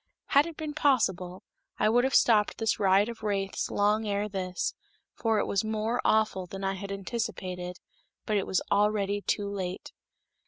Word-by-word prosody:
Had 285 +2 +5
it 330 - -9
been 310 -2 -4
possible, 190 - +1 0.3
I 215 - +2
would 240 +3 +4
have 265 - +1
stopped 215 -3 +4
this 225 -1 0
riot 195 +1 +4
of 235 -1 -7
wraiths 200 -2 -2
long 210 +2 +1
ere 205 +1 0
this, 185 -3 -3 0.4
for 225 -2 0
it - - +1
was 200 - 0
more 220 +2 -1
awful 215 -4 +2
than 195 +2 -7
I 195 0 0
had 200 +1 -6
anticipated, 185 -3 -4 0.5
but 215 - 0
it 195 - 0
was 190 - 0
already 205 0 +2
too 205 0 -1
late. 190 -2 -5
205 Hz, 170 wpm, -28 LUFS, 195-220 Hz, 0.5 s, Had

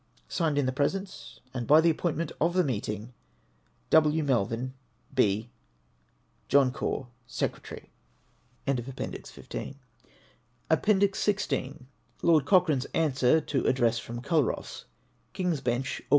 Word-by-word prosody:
Signed 160 -4 0
in 145 - +2
the 130 - +1
presence 145 -4 -3
and 120 -2 -4
by 155 +2 +7
the 165 +1 +5
appointment 165 0 -2
of 170 +3 +2
the 185 - +4
meeting, 110 - -3 0.8
W. 155 0 +4
Melville, 125 -1 0 0.4
B. 110 -2 +1 1.0
John 140 -2 +4
Caw, 135 -1 -3 0.2
Seeretarj/. - - -4 0.8
ANSWEES 130 -4 0
TO - - -5
ADDRESSES. - - -7
467 140 - -7 0.9
APPENDIX 200 +4 +3
XYL 140 -10 -1 0.4
LORD 160 -5 +4
COCHRANE's 165 -9 +3
ANSWER 150 -1 +3
TO 140 -3 -1
ADDRESS 120 -3 +2
FROM 120 +1 -7
CULROSS. 155 -5 -1 0.5
King's 180 -6 -1
Bencli, 125 +2 -1
Aug. - - -20
140 Hz, 120 wpm, -28 LUFS, 125-160 Hz, 1.0 s, by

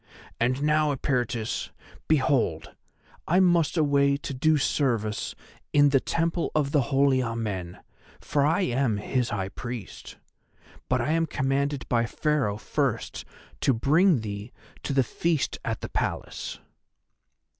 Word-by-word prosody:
And 130 +4 +1
now, 150 0 +3
Eperitus, 125 -5 -1 0.4
behold 130 - +1 0.5
I 180 +3 +4
must 175 -3 +3
away 140 -2 +3
to 140 - -6
do 155 +4 +3
service 115 -7 0 0.4
in 145 -1 +6
the 135 -1 +4
Temple 165 +4 -1
of 145 -2 +1
the 145 - +3
Holy 135 -1 +3
Amen, 105 -7 -3 0.4
for 145 -1 0
I 155 +6 +2
am 125 - +1
his 125 +4 -1
High 95 -2 -2
Priest. 120 -1 -8 0.7
But 125 0 +2
I 135 +6 0
am 165 0 +1
commanded 140 -1 -1
by 120 -1 +1
Pharaoh 145 -8 0
first - - -2 0.3
to 135 - +2
bring 155 - +3
thee 105 +1 -6 0.3
to 140 - -3
the 135 -1 +4
feast 160 +4 -1
at - - -3
the - - -5
Palace." - - -3
135 Hz, 135 wpm, -26 LUFS, 115-150 Hz, 0.7 s, in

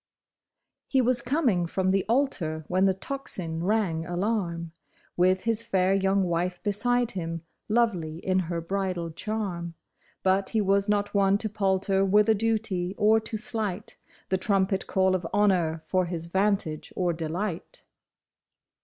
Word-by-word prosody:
E - - +6
was 250 -1 +2
coming 245 - +1
from 185 +2 0
the 195 -1 +2
altar 175 - 0
when 185 +2 +2
the 190 - +4
tocsin 185 -8 -5
rang 190 -5 +1
alarm, 175 -2 -2 0.4
With 185 +1 +3
his 230 -1 0
fair 195 -5 +1
young 195 0 +2
wife 175 +1 -1
beside 240 +4 +1
him, 165 -3 -4 0.3
lovely 195 -9 +1
in 185 +2 0
her 170 -1 -2
bridal 180 -1 -2
charm; 175 -3 -4 0.5
But 190 +1 +2
he 225 - 0
was 200 0 +2
not 205 0 +1
one 200 -1 +4
to 215 +1 -2
palter 195 -1 +1
with 205 +2 +4
a - - +7
duty, 210 -4 -1
or 215 +1 +4
to 220 0 -5
slight 210 -3 -2 0.3
The 190 - +1
trumpet 195 0 +1
call 190 -1 +2
of 180 -2 -1
honor 175 -6 +2
for 185 -1 +1
his 170 -1 -4
vantage 190 -3 0
or 180 -2 +1
delight. 165 +3 -4
190 Hz, 145 wpm, -27 LUFS, 175-210 Hz, 0.5 s, a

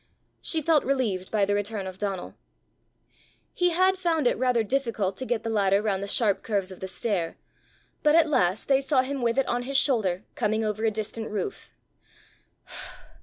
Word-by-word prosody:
She 320 -2 0
felt 315 -1 +3
relieved 225 -9 -1
by 210 -2 +2
the 205 - 0
return 205 0 -2
of 185 0 -8
Donal. 195 -3 -3 1.2
He 355 0 +2
had 370 +2 +2
found 330 -5 +1
it 245 - +3
rather 250 -3 +2
difficult 225 -6 -1
to 260 - -4
get 225 -2 -1
the 225 - -2
ladder 200 -2 +3
round 205 -2 -1
the 200 - -4
sharp 205 -1 +2
curves 200 -4 -1
of 185 - -10
the 190 - -5
stair; 185 -4 -2 0.6
but 300 -1 +4
at 330 -1 +5
last 215 - +1
they 270 -1 +4
saw 270 -2 +2
him 275 0 -3
with 235 0 +1
it 270 - +2
on 245 - 0
his 270 +2 +1
shoulder 210 -10 +2
coming 220 +1 0
over 215 +1 -2
a - - +4
distant 220 +1 -5
roof. 215 - -5
225 Hz, 185 wpm, -26 LUFS, 200-270 Hz, 1.2 s, at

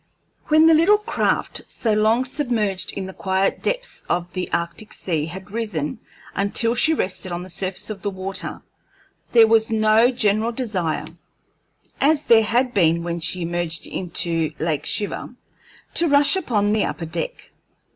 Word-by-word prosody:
When 310 +1 +5
the 325 - +7
little 335 +7 +5
craft, 425 +2 -1
so 225 -3 -1
long 220 +4 +2
submerged 235 -8 -1
in 195 - -4
the 190 - -8
quiet 190 +1 0
depths - - -3
of 175 0 -1
the 185 -1 -4
Arctic 170 +6 -3
Sea, 160 -4 -2
had 190 +4 -9
risen 205 -10 -3 0.3
until 210 +4 +1
she 280 +6 +3
rested 185 -5 -2
on 175 +1 -4
the 185 - -9
surface 190 +3 -3
of 200 -3 -7
the 205 - -1
water, 190 0 -5 0.7
there 230 -2 +8
was 220 0 +3
no 220 +1 +4
general 225 -2 +1
desire, 200 -10 -2 0.9
as 295 +2 +3
there 225 -1 +6
had 245 +3 +1
been 170 -3 +3
when 170 0 -3
she 175 +1 0
emerged 170 -1 -3
into 165 -3 -2
Lake 155 -2 -2
Shiver, 210 +3 -3 0.6
to 340 - +4
rush 285 +1 +4
upon 210 - 0
the 215 - +2
upper 165 - -4
deck. - - -5
205 Hz, 155 wpm, -22 LUFS, 180-240 Hz, 0.9 s, there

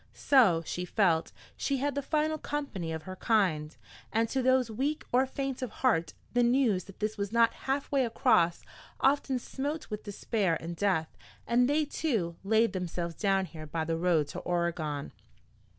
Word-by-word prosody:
So, 210 -12 +4
she 180 - -3
felt, 180 -4 +1 0.2
she 275 - -1
had 285 +2 -1
the 285 - -1
final 310 +2 0
company 275 - -4
of 160 -1 -5
her 185 0 -8
kind. 175 -10 +1 0.3
And 225 +1 +2
to 265 - 0
those 255 -2 +3
weak 280 +7 -2
or 255 +2 +3
faint 270 -1 -4
of 255 - -2
heart 170 -11 0 0.2
the 245 - +3
news 240 -6 +2
that 195 - -14
this 215 0 -2
was 200 0 -2
not 230 0 +4 0.2
halfway 275 0 +1
across 220 -7 +2 0.4
often 270 -1 +2
smote 285 +3 -4
with 210 - -3
despair 205 -3 -1
and 170 +1 -6
death, 170 -4 0 0.3
and 245 +2 +3
they, 300 +1 +2
too, 225 - -1
laid 220 +3 +3
themselves 175 -2 -3
down 195 +2 +1
here 155 -2 -9
by 160 +1 -2
the 165 0 -1
road 165 -3 +2
to - - -5
Oregon. 170 -5 -2
215 Hz, 170 wpm, -30 LUFS, 170-260 Hz, 0.4 s, So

